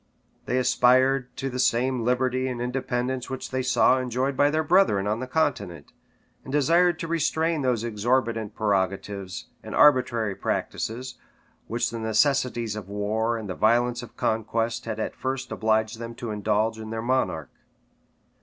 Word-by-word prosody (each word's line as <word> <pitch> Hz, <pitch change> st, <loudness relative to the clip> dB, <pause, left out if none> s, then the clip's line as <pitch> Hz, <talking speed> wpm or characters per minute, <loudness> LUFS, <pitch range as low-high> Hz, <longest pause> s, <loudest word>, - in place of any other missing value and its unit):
They 125 Hz, -, 0 dB
aspired 125 Hz, 0 st, +3 dB
to 135 Hz, -, -3 dB
the 125 Hz, -1 st, -4 dB
same 125 Hz, 0 st, +2 dB
liberty 130 Hz, +1 st, +1 dB
and 125 Hz, -2 st, -4 dB
independence 125 Hz, 0 st, -2 dB
which 130 Hz, 0 st, -6 dB
they 130 Hz, 0 st, 0 dB
saw 130 Hz, 0 st, +3 dB
enjoyed 130 Hz, +2 st, -1 dB
by 145 Hz, +2 st, +4 dB
their 155 Hz, +1 st, 0 dB
brethren 155 Hz, -, +3 dB
on 105 Hz, +2 st, -1 dB
the 130 Hz, -, -4 dB
continent, 100 Hz, -, -2 dB, 0.5 s
and 130 Hz, -, -8 dB
desired 165 Hz, +4 st, +3 dB
to 165 Hz, -, -3 dB
restrain 165 Hz, -1 st, 0 dB
those 125 Hz, -4 st, 0 dB
exorbitant 115 Hz, -1 st, -1 dB
prerogatives 100 Hz, -2 st, -2 dB
and -, -, -7 dB
arbitrary 125 Hz, -7 st, +4 dB
practices, 125 Hz, +5 st, -3 dB, 0.5 s
which 120 Hz, 0 st, -1 dB
the 115 Hz, -, -5 dB
necessities 115 Hz, 0 st, +1 dB
of 100 Hz, -3 st, -7 dB
war 110 Hz, +3 st, -1 dB
and 110 Hz, -2 st, -6 dB
the 95 Hz, -, -3 dB
violence 120 Hz, +4 st, +2 dB
of 120 Hz, -, -12 dB
conquest 115 Hz, +1 st, -1 dB
had 110 Hz, -1 st, -4 dB
at -, -, -3 dB
first 130 Hz, 0 st, -4 dB
obliged 110 Hz, +1 st, 0 dB
them 115 Hz, 0 st, -7 dB
to 115 Hz, -1 st, -5 dB
indulge 105 Hz, +2 st, 0 dB
in 110 Hz, 0 st, -7 dB
their 110 Hz, 0 st, -4 dB
monarch. 130 Hz, +2 st, -1 dB
120 Hz, 155 wpm, -25 LUFS, 110-130 Hz, 0.5 s, by